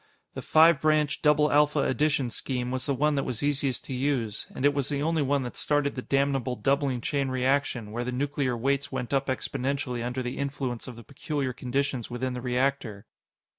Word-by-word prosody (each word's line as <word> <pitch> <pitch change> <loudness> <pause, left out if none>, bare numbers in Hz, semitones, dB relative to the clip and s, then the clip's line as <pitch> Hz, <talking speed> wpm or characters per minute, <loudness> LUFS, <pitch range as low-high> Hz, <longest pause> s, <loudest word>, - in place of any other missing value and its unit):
The - - -5
five 160 -1 +5
branch, 155 -1 +2
double 150 0 +4
alpha 150 0 +4
addition 140 -3 +1
scheme 125 0 -3
was 130 +2 -3
the 140 - +1
one 150 +3 +2
that 140 -1 0
was 125 +1 -4
easiest 140 -3 0
to - - -5
use 125 -5 -1
and 135 - -1
it 145 - +5
was 140 -2 -1
the 145 -1 -1
only 165 0 +1
one 140 0 +1
that 125 - -6
started 145 -1 +1
the 125 - -4
damnable 135 -2 0
doubling 135 +2 0
chain 140 -3 -1
reaction, 130 -4 0
where 120 +2 -2
the 125 - -3
nuclear 135 -1 -1
weights 140 +3 0
went 130 -1 -4
up 135 0 +1
exponentially 130 -1 -2
under 125 +1 -3
the 125 0 -4
influence 135 -4 -3
of 125 - -7
the 115 - -11
peculiar 140 -1 -3
conditions 130 0 -2
within 125 +1 -3
the 125 - -5
reactor. 125 -4 -1
135 Hz, 200 wpm, -27 LUFS, 125-145 Hz, -, five